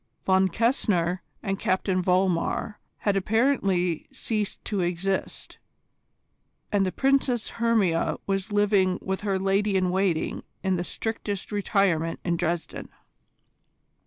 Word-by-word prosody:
Von 190 0 +4
Kessner 185 -5 +1 0.2
and 195 -2 -2
Captain 185 0 +1
Vollmar 185 +4 +1 0.2
had 205 -2 +1
apparently 195 - +1
ceased 215 -3 -3
to 205 -3 -1
exist, 180 +2 -2 1.1
and 200 -2 +2
the - - -1
Princess 265 -2 +1
Hermia 210 -8 +2
was 195 +1 -2
living 200 -3 +3
with 190 0 -3
her 200 -2 0
lady 195 +1 +1
in 185 -1 +1
waiting 185 -3 0 0.2
in 190 -1 +1
the 175 - -1
strictest 205 0 -4
retirement 195 -5 +1
in 170 -1 +1
Dresden. 170 0 -3
195 Hz, 115 wpm, -26 LUFS, 180-210 Hz, 1.1 s, Von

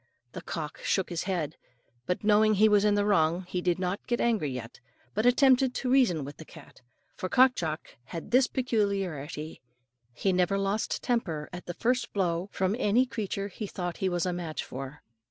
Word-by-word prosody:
The 180 - -7
cock 160 -2 -5
shook 190 -2 0
his 170 0 -2
head; 170 -6 -2 0.5
but 180 - -1
knowing 215 +1 +4
he 215 +2 +6
was 205 -1 +4
in 210 -1 +3
the 205 0 +2
wrong, 175 -3 +2
he 180 0 -2
did 175 -1 +1
not 185 +2 -3
get 240 - 0
angry 220 -11 +1
yet, 125 -3 -7 0.3
but 215 +4 +1
attempted 260 0 +4
to 250 - -1
reason 210 - +3
with 145 +1 -9
the - - -9
cat. 160 -4 -15 0.3
For 185 - -4
Cock 260 +3 +6
Jock 160 -7 -4
had 165 +8 -7
this 255 +1 +5
peculiarity: 195 - -2 0.5
he 190 +10 0
never 180 +2 +2
lost 195 +2 -1
temper 170 - -1
at 180 - -8
the 175 - -5
first 245 0 0
blow 180 -1 0
from 190 +2 0
any 235 +4 +3
creature 200 -5 -3
he 205 +2 -6
thought 175 -3 -4
he 190 - 0
was 175 -1 0
a 180 - 0
match 165 -4 -4
for. 135 +2 -8
190 Hz, 190 wpm, -28 LUFS, 165-215 Hz, 0.5 s, he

